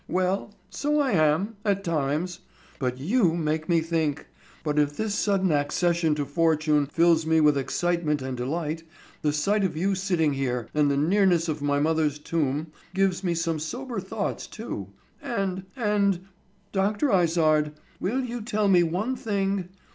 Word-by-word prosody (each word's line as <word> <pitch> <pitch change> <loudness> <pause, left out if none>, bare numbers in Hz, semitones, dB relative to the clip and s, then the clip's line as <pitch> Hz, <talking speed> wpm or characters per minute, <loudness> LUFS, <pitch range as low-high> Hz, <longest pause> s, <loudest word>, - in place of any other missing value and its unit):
"Well, 185 +3 0 0.2
so 295 +1 0
I 275 -3 +2
am, 185 +5 +2
at 200 -2 0
times. 160 +2 -1 0.4
But 125 -2 -1
you 175 - +2
make 155 -1 -1
me 170 -1 +4
think; 160 -3 -1 0.4
and 150 0 +1
if 145 0 +1
this 220 -2 -1
sudden 195 -3 +1
accession 160 +2 +1
to 145 -1 -2
fortune 155 -1 +2
fills 165 +1 +3
me 160 0 +4
with 150 -1 +5
excitement 155 +2 0
and 130 -1 -4
delight, 155 +5 -3 0.4
the 150 - +2
sight 195 +8 +1
of 170 -5 -1
you 195 +4 +1
sitting 180 -6 +1
here, 125 -3 -2
and 150 -1 +3
the 140 - +1
nearness 175 +2 +3
of 155 -2 -2
my 145 0 +1
mother's 155 -1 +1
tomb, 150 0 -2 0.2
gives 190 -1 +1
me 175 -2 0
some 165 -1 -1
sober 240 - -4
thoughts 200 +2 -4
too, 215 - -6 0.3
and—and—Dr. 195 +1 -1
Izard, 160 -4 +3 0.3
will 240 +8 0
you 245 -1 -4
tell 215 -2 0
me 180 -2 +6
one 185 +10 -1
thing? 195 -5 -1
170 Hz, 155 wpm, -26 LUFS, 150-195 Hz, 0.4 s, me